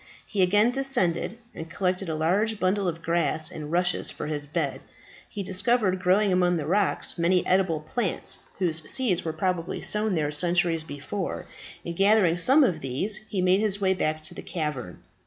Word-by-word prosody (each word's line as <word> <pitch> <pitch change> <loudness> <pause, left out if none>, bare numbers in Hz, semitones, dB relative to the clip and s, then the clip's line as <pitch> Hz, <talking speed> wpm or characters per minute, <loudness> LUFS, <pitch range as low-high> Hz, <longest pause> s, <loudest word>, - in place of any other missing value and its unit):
He 205 - -1
again 205 +6 +4
descended, 245 -7 0 0.2
and 160 +1 -8
collected 185 0 -1
a 160 - -1
large 200 +8 +1
bundle 190 +1 +1
of 165 -1 -4
grass 165 -2 0
and 150 -1 -7
rushes 180 +1 +1
for - - -6
his 150 -1 -4
bed. 150 -2 -2 0.5
He 200 - -5
discovered 195 +1 +1
growing 190 +2 +3
among 180 -1 +2
the 150 - -3
rocks 190 +1 0
many 175 +2 +2
edible 180 -4 +2
plants, 195 +4 -2 0.2
whose 165 -4 0
seeds 200 -9 +1
were 160 - -2
probably 175 +1 -2
sown 210 -2 -1
there 150 -2 0
centuries 170 +1 +1
before, 160 +6 -5 0.4
and 170 - -4
gathering 195 -3 +4
some 270 - +5
of 180 -11 +1
these 140 - -2
he 190 -3 -1
made 185 +1 +4
his 205 -2 0
way 190 -1 +2
back 155 -4 -1
to 155 - -3
the - - -8
cavern. 150 - -5
180 Hz, 175 wpm, -26 LUFS, 160-200 Hz, 0.5 s, some